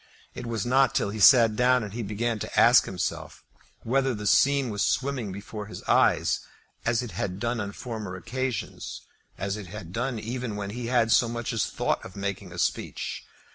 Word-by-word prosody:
It 125 Hz, -1 st, -7 dB
was 115 Hz, -4 st, -2 dB
not 130 Hz, +1 st, +3 dB
till 100 Hz, -, +1 dB
he 110 Hz, -, -5 dB
sat 115 Hz, 0 st, +7 dB
down 125 Hz, +1 st, +3 dB
that 105 Hz, -2 st, -7 dB
he 120 Hz, -, -3 dB
began 110 Hz, +2 st, -2 dB
to -, -, -1 dB
ask -, -, +7 dB
himself -, -, -4 dB, 0.4 s
whether 135 Hz, +1 st, +1 dB
the 105 Hz, 0 st, -6 dB
scene 135 Hz, +4 st, +3 dB
was 105 Hz, -1 st, -2 dB
swimming 130 Hz, -6 st, 0 dB
before 100 Hz, +2 st, -7 dB
his -, -, -9 dB
eyes -, -, +3 dB, 0.5 s
as 115 Hz, +1 st, +2 dB
it 120 Hz, -, -6 dB
had 90 Hz, +2 st, -3 dB
done 120 Hz, +1 st, -1 dB
on 100 Hz, -1 st, -3 dB
former 110 Hz, -4 st, -6 dB
occasions; 125 Hz, +5 st, -4 dB, 0.4 s
as 100 Hz, +2 st, -2 dB
it 105 Hz, -3 st, -8 dB
had 95 Hz, -2 st, -9 dB
done 125 Hz, +2 st, -2 dB
even 115 Hz, 0 st, -4 dB
when 100 Hz, -1 st, -4 dB
he 120 Hz, +1 st, -5 dB
had 120 Hz, -2 st, +2 dB
so 115 Hz, 0 st, +4 dB
much 120 Hz, 0 st, -3 dB
as 115 Hz, -, 0 dB
thought -, -, -1 dB
of 90 Hz, -, -10 dB
making 100 Hz, -1 st, -4 dB
a -, -, -9 dB
speech. -, -, -2 dB
115 Hz, 195 wpm, -27 LUFS, 105-125 Hz, 0.5 s, sat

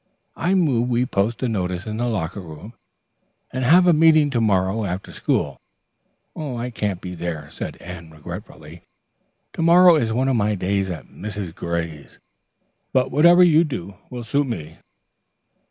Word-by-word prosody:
"I 185 Hz, +3 st, 0 dB
move 130 Hz, -10 st, +2 dB
we 120 Hz, +1 st, +1 dB
post 110 Hz, +2 st, -1 dB
a -, -, +2 dB
notice 90 Hz, -5 st, -2 dB
in 110 Hz, 0 st, -4 dB
the 120 Hz, +1 st, -1 dB
locker 95 Hz, -5 st, -3 dB
room 90 Hz, +5 st, -10 dB, 0.8 s
and 130 Hz, +1 st, -2 dB
have 175 Hz, +8 st, +6 dB
a 175 Hz, -, +5 dB
meeting 155 Hz, -2 st, +5 dB
to 120 Hz, -3 st, 0 dB
morrow 100 Hz, 0 st, +1 dB
after 95 Hz, 0 st, -4 dB
school. -, -, -2 dB, 0.7 s
"I 125 Hz, -5 st, -4 dB
can't 105 Hz, -5 st, -3 dB
be 90 Hz, -, -6 dB
there," 80 Hz, -4 st, -5 dB
said -, -, -6 dB
Anne 85 Hz, -2 st, -9 dB
regretfully. 80 Hz, 0 st, -10 dB, 0.7 s
"To -, -, -4 dB
morrow 170 Hz, +1 st, +7 dB
is 115 Hz, -6 st, 0 dB
one 130 Hz, +4 st, 0 dB
of 135 Hz, -, +2 dB
my 105 Hz, -2 st, +1 dB
days 95 Hz, +1 st, -1 dB
at 85 Hz, -6 st, -6 dB
Mrs. 100 Hz, -5 st, -7 dB
Gray's, 85 Hz, -4 st, -5 dB, 0.7 s
but 130 Hz, -1 st, +1 dB
whatever 170 Hz, +6 st, +6 dB
you 165 Hz, -2 st, +5 dB
do 110 Hz, -, -5 dB, 0.2 s
will 125 Hz, -1 st, -6 dB
suit 140 Hz, +5 st, 0 dB
me." 80 Hz, -10 st, -6 dB
110 Hz, 160 wpm, -22 LUFS, 90-135 Hz, 0.8 s, morrow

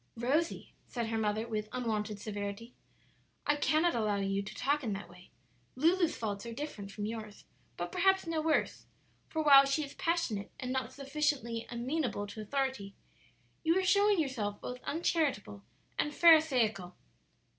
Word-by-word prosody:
"Rosie," 285 Hz, +8 st, -1 dB
said 235 Hz, -2 st, -3 dB
her 225 Hz, -, -1 dB
mother, 215 Hz, +1 st, 0 dB
with 215 Hz, -2 st, -3 dB
unwonted 215 Hz, -4 st, -2 dB
severity, 205 Hz, +3 st, -5 dB, 0.7 s
"I 290 Hz, -, +3 dB
cannot 310 Hz, +3 st, +2 dB
allow 215 Hz, -3 st, +1 dB
you 195 Hz, 0 st, 0 dB
to 200 Hz, -, -8 dB
talk 285 Hz, +3 st, 0 dB
in 220 Hz, -4 st, -1 dB
that 195 Hz, +1 st, -6 dB
way. 180 Hz, 0 st, -16 dB, 0.5 s
Lulu's 335 Hz, +5 st, +2 dB
faults 205 Hz, -3 st, -3 dB
are 230 Hz, -, -5 dB
different 225 Hz, -7 st, -6 dB
from 205 Hz, 0 st, -4 dB
yours, 215 Hz, -2 st, -7 dB, 0.3 s
but 175 Hz, 0 st, -4 dB
perhaps 385 Hz, 0 st, +3 dB
no 330 Hz, -1 st, -1 dB
worse; 315 Hz, 0 st, 0 dB, 0.4 s
for 315 Hz, -1 st, -1 dB
while 275 Hz, -2 st, +9 dB
she 275 Hz, +3 st, 0 dB
is 280 Hz, -, -8 dB
passionate 330 Hz, -13 st, -1 dB
and 255 Hz, -1 st, -4 dB
not 260 Hz, -2 st, -2 dB
sufficiently 275 Hz, -4 st, -2 dB
amenable 245 Hz, -3 st, -2 dB
to 210 Hz, +2 st, -8 dB
authority, 230 Hz, -4 st, -2 dB, 0.7 s
you 330 Hz, +2 st, +3 dB
are 380 Hz, -, +2 dB
showing 405 Hz, 0 st, +4 dB
yourself 225 Hz, -9 st, -2 dB
both 250 Hz, 0 st, -6 dB
uncharitable 295 Hz, -, -1 dB, 0.4 s
and 295 Hz, 0 st, 0 dB
Pharisaical." 255 Hz, -, +4 dB
250 Hz, 155 wpm, -32 LUFS, 210-305 Hz, 0.7 s, while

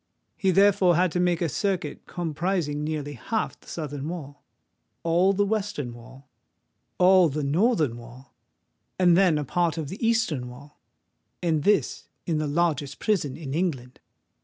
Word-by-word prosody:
He 195 Hz, -, 0 dB
therefore 190 Hz, -2 st, +4 dB
had 180 Hz, +1 st, +2 dB
to 180 Hz, -, -1 dB
make 175 Hz, -1 st, +1 dB
a -, -, +1 dB
circuit 180 Hz, -1 st, -3 dB
comprising 165 Hz, -2 st, -2 dB
nearly 150 Hz, -2 st, -3 dB
half 215 Hz, -, -3 dB
the -, -, -23 dB
southern 145 Hz, -2 st, -5 dB
wall—all 170 Hz, +3 st, -3 dB
the 205 Hz, +1 st, +1 dB
western 195 Hz, -, -2 dB
wall—all 140 Hz, +8 st, -1 dB
the 150 Hz, +1 st, -3 dB
northern 155 Hz, -, +1 dB
wall—and 130 Hz, +8 st, -3 dB
then 180 Hz, -4 st, +4 dB
a 150 Hz, -, -2 dB
part 170 Hz, +3 st, 0 dB
of 155 Hz, -4 st, -4 dB
the 195 Hz, +7 st, -7 dB
eastern 220 Hz, -, +1 dB
wall;—and 140 Hz, -, -7 dB
this 205 Hz, +5 st, +1 dB, 0.2 s
in 160 Hz, -3 st, 0 dB
the 155 Hz, -, -1 dB
largest 150 Hz, -2 st, 0 dB
prison 175 Hz, -, -1 dB
in 145 Hz, -4 st, -6 dB
England! 140 Hz, -7 st, -2 dB
160 Hz, 135 wpm, -25 LUFS, 145-185 Hz, 0.2 s, therefore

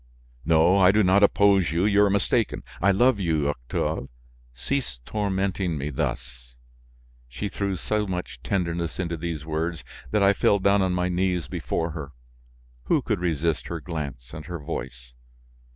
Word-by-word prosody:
"No, 85 Hz, +4 st, +4 dB
I 95 Hz, -1 st, +7 dB
do 105 Hz, +1 st, +3 dB
not 95 Hz, +2 st, +4 dB
oppose 100 Hz, -3 st, +4 dB
you, 85 Hz, +4 st, +1 dB
you 105 Hz, 0 st, +4 dB
are 100 Hz, -, +4 dB
mistaken; 100 Hz, +3 st, 0 dB, 0.2 s
I 100 Hz, -, +4 dB
love 115 Hz, +4 st, +4 dB
you, 80 Hz, -6 st, +1 dB
Octave; -, -, -3 dB, 0.4 s
cease 65 Hz, -, -3 dB
tormenting 95 Hz, -4 st, -1 dB
me 70 Hz, +2 st, -3 dB
thus." 60 Hz, -2 st, -4 dB, 0.7 s
She 100 Hz, -, -4 dB
threw 100 Hz, 0 st, -2 dB
so 105 Hz, +2 st, -1 dB
much 90 Hz, -1 st, -5 dB
tenderness 85 Hz, -4 st, -2 dB
into 85 Hz, -2 st, -2 dB
these 80 Hz, -2 st, -5 dB
words 80 Hz, 0 st, -3 dB, 0.3 s
that 105 Hz, -, +2 dB
I 100 Hz, +1 st, +5 dB
fell 100 Hz, -, +3 dB
down 100 Hz, +1 st, +3 dB
on 95 Hz, -1 st, +1 dB
my 90 Hz, 0 st, 0 dB
knees 90 Hz, -3 st, 0 dB
before 85 Hz, 0 st, -2 dB
her. 75 Hz, -3 st, -7 dB, 0.7 s
Who 150 Hz, -, +2 dB
could 110 Hz, -5 st, -1 dB
resist 80 Hz, -2 st, -1 dB
her 85 Hz, -, -4 dB
glance 70 Hz, -7 st, -6 dB
and 75 Hz, +1 st, -8 dB
her 90 Hz, -1 st, -4 dB
voice? 65 Hz, -6 st, -7 dB
90 Hz, 160 wpm, -25 LUFS, 75-100 Hz, 0.7 s, I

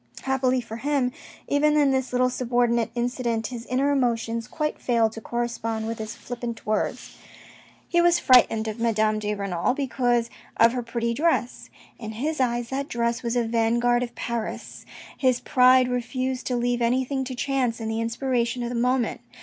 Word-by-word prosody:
Happily 260 Hz, -1 st, +1 dB
for 225 Hz, -1 st, -8 dB
him, 275 Hz, 0 st, 0 dB, 0.4 s
even 300 Hz, +1 st, +3 dB
in 285 Hz, -2 st, +4 dB
this 265 Hz, -1 st, -1 dB
little 255 Hz, 0 st, +2 dB
subordinate 240 Hz, -2 st, +1 dB
incident, 240 Hz, -2 st, -1 dB
his 240 Hz, 0 st, -6 dB
inner 270 Hz, +3 st, +1 dB
emotions 230 Hz, -3 st, 0 dB
quite 300 Hz, +3 st, -3 dB
failed 230 Hz, -3 st, +2 dB
to 225 Hz, -, -9 dB
correspond 230 Hz, -2 st, -3 dB
with 225 Hz, 0 st, -4 dB
his 215 Hz, 0 st, -5 dB
flippant 240 Hz, -2 st, -6 dB
words. 215 Hz, 0 st, -2 dB, 0.7 s
He 345 Hz, -, +3 dB
was 345 Hz, 0 st, +4 dB
frightened 245 Hz, -7 st, +4 dB
of 215 Hz, +1 st, -5 dB
Madame 215 Hz, -2 st, +1 dB
de 210 Hz, 0 st, -2 dB
Renal 195 Hz, +2 st, -1 dB
because 245 Hz, -4 st, 0 dB, 0.3 s
of 230 Hz, +1 st, +5 dB
her 250 Hz, -, -1 dB
pretty 235 Hz, 0 st, -2 dB
dress. 290 Hz, -3 st, 0 dB, 0.3 s
In 220 Hz, -2 st, -6 dB
his 295 Hz, +7 st, -2 dB
eyes, 240 Hz, -2 st, 0 dB
that 275 Hz, +1 st, -3 dB
dress 235 Hz, 0 st, -1 dB
was 235 Hz, 0 st, -2 dB
a 240 Hz, -, +2 dB
vanguard 235 Hz, +1 st, +2 dB
of 240 Hz, -1 st, -4 dB
Paris. 235 Hz, -2 st, -5 dB, 0.3 s
His 255 Hz, -2 st, +2 dB
pride 255 Hz, 0 st, +5 dB
refused 250 Hz, +1 st, -2 dB
to 250 Hz, -, 0 dB
leave 245 Hz, 0 st, 0 dB
anything 260 Hz, +3 st, +1 dB
to 255 Hz, 0 st, -5 dB
chance 250 Hz, -3 st, -1 dB
and 220 Hz, -1 st, -3 dB
the 225 Hz, +1 st, -1 dB
inspiration 240 Hz, +1 st, -1 dB
of 235 Hz, -, -3 dB
the -, -, -4 dB
moment. 250 Hz, +1 st, 0 dB
240 Hz, 175 wpm, -25 LUFS, 230-255 Hz, 0.7 s, of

